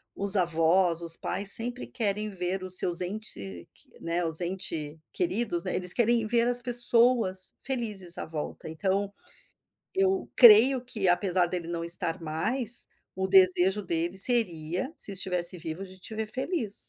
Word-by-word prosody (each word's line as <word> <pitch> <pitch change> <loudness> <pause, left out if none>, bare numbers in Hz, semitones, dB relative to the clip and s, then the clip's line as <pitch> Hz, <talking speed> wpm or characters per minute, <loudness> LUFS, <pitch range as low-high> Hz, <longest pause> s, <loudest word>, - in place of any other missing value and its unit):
os 200 +1 +1
avós, 170 0 +1
os 165 -1 +4
pais 200 0 0
sempre 245 +2 +1
querem 210 -2 -3
ver 185 0 -5
os 185 0 +5
seus 175 0 +4
ente 100 - -7
q - - -18
né, 170 +1 -3
os 160 0 +5
entes 170 -4 -5
queridos, 235 - -2
né, - - -4
eles 180 -1 +2
querem 235 -1 0
ver 235 +1 +1
as 245 0 0
pessoas 240 -5 +1
felizes 210 -9 -1
à - - -6
volta 160 0 -8
então, 195 +5 -3 0.8
eu 385 -1 -1
creio 245 +2 +6
que 220 -7 -2
apesar 180 0 +1
dele 175 -1 -6
não 170 -1 -5
estar 170 0 +1
mais, 225 +10 -1 0.3
o 190 0 -3
desejo 190 +1 +3
dele 175 0 -4
seria, 185 - +4
se - - -2
estivesse 180 -2 -2
vivo, 165 +3 -8
de 185 0 -15
te 205 - -12
ver 220 0 -4
feliz. 260 - -3
190 Hz, 155 wpm, -26 LUFS, 175-230 Hz, 0.8 s, creio